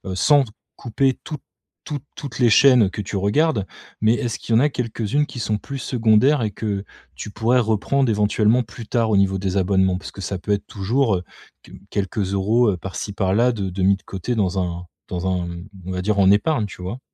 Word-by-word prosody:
Sans 140 +7 +4 0.3
couper 130 +3 0
toutes 150 -3 -6 0.4
toutes 145 -4 -5
toutes 140 -8 -7
les 120 -3 +5
chaînes 125 -3 +6
que 105 - -5
tu 100 - -6
regardes, 105 +2 +1 0.4
mais 110 +1 +4
est-ce 120 -2 -3
qu'il 115 - -3
y - - +6
en - - +4
a 150 - +4
quelques-unes 120 +2 -1
qui 125 - -8
sont 105 -1 -1
plus 140 +5 -7
secondaires 120 +3 +3
et 105 - -1
que 100 -2 -3 0.3
tu - - -7
pourrais 115 +4 +2
reprendre 115 +4 +1
éventuellement 105 +3 +2
plus 115 +1 -10
tard 115 -2 +1
au - - +3
niveau 95 -1 +2
des 95 0 -2
abonnements? 95 -1 +2
Parce - - -9
que - - -13
ça 95 +2 -3
peut 105 - -4
être 100 - -3
toujours, 110 +3 0
heu, 90 - -6 0.4
q - - -14
quelques 100 -1 -2
euros, 105 +3 +3
heu, - - -2
par-ci 95 +3 -6
par-là 105 +5 +2
de 100 -4 -3
de 95 +1 -3
mis 100 +1 +5
de 95 - -26
côté 100 +6 -4
dans 95 -3 0
un 90 0 -4 0.2
dans 90 0 -3
un 90 -2 -1 0.4
on 95 - -5
va 90 - -2
dire: 100 +1 0
«En 95 0 +5
épargne» 110 +3 +2
tu 90 - -11
vois? 100 +8 -5
105 Hz, 215 wpm, -21 LUFS, 95-120 Hz, 0.4 s, chaînes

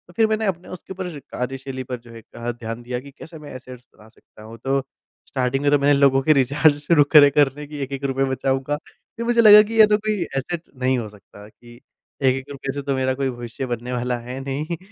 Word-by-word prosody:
फिर 220 +2 +3
मैंने 220 0 -1
अपने 180 -2 -3
उसके 185 +1 -9
ऊपर 185 -1 -5
कार्यशैली 130 0 -6
पर 125 -1 -5
जो 120 0 -16
है 115 0 -11
कहा 120 +2 -6
ध्यान 115 0 -7
दिया 125 0 -4
कि 140 +2 -13
कैसे 160 -1 -11
मैं 145 -1 -11
एसेट्स 125 -1 -11
बना 105 - -17
सकता 110 - -19
हूँ 115 +1 -11
तो 135 +1 +1 0.5
स्टार्टिंग 130 0 -1
में 145 - +3
तो 145 - +4
मैंने 145 +1 +4
लोगों 135 -1 +4
के 155 - +5
रिचार्ज 145 +2 +3
शुरू 150 0 +4
करे 145 -2 +8
करने 145 0 +1
कि 150 0 -8
एक-एक 135 +1 -6
रुपए 135 0 0
बचाऊँगा। 135 +2 -1
फिर 230 +8 -11
मुझे 235 0 +3
लगा 210 -1 +10
कि 220 +2 -7
ये 215 - +10
तो 210 0 +3
कोई 215 -2 -2 0.2
एसेट 160 +5 -3 0.2
नहीं 130 0 +2
हो 115 -3 -4
सकता 105 0 -16
कि 120 +2 -17 0.5
1-1 130 0 +1
रुपए 135 -1 -5
से 140 - -4
तो 140 -1 -2
मेरा 130 0 0
कोई 135 0 -1
भविष्य 120 +1 -6
बनने 120 0 -4
वाला 125 0 -1
है 125 +2 -7
नहीं। 150 +5 -4
135 Hz, 230 wpm, -22 LUFS, 125-150 Hz, 0.5 s, लगा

